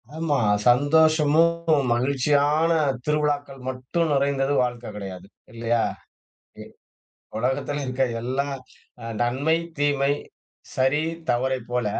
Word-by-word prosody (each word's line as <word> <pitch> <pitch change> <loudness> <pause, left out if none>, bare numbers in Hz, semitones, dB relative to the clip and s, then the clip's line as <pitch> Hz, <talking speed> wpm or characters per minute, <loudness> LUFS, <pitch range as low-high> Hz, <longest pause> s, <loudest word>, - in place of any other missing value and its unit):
ஆமா, 160 -3 0 0.3
சந்தோஷமும் 155 +2 +3
மகிழ்ச்சியான 145 +5 +2 0.3
திருவிழாக்கள் 145 -2 -1
மட்டும் 130 +6 -2
நிறைந்தது 140 0 +1
வாழ்க்க 120 -1 -4
கிடையாது. 95 -3 -7 0.3
இல்லையா? 115 0 0 0.8
இ - - -7 0.8
உலகத்தில 135 +4 -1
இருக்க 130 +1 -1 0.2
எல்லா 130 +4 -2 0.6
அ - - -8 0.2
நன்மை, 135 +7 +1 0.2
தீமை, 145 -1 +2 0.6
சரி 130 +4 +2 0.3
தவறை 130 +2 0
போல, 125 -3 -1
140 Hz, 95 wpm, -24 LUFS, 125-150 Hz, 0.8 s, சந்தோஷமும்